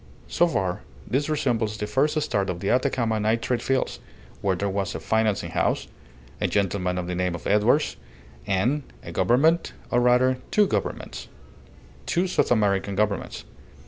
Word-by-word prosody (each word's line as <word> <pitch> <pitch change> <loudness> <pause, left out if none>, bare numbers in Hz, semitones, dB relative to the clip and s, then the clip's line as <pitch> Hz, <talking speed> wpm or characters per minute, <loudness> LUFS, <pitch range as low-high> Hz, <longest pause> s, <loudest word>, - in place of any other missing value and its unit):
So 175 - +3
far 95 - -1 0.3
this 140 +4 0
resembles 120 -8 0
the 105 - -2
first 145 +7 +1
start 100 -10 -1
of 90 -1 -3
the 100 - 0
Atacama 120 -3 +1
nitrate 115 +3 0
fields, 135 -1 -1 0.4
where 95 -2 +1
there 100 +3 -2
was 100 0 -2
a - - -3
financing 110 -2 0
house, - - 0 0.5
a - - +2
gentleman 95 -2 0
of 90 - -2
the 90 - -3
name 90 0 -1
of 85 - -9
Edwards, 105 +9 +2 0.5
and 120 +10 +1 0.2
a - - -7
Government; 155 +8 +2 0.2
or, 120 - +3
rather, 125 +1 +3
two 210 - +4
Governments - - -3 0.8
two 175 +1 +1
South 185 - +1
American 100 -3 +2
Governments. 105 -1 -1
110 Hz, 155 wpm, -25 LUFS, 100-130 Hz, 0.8 s, two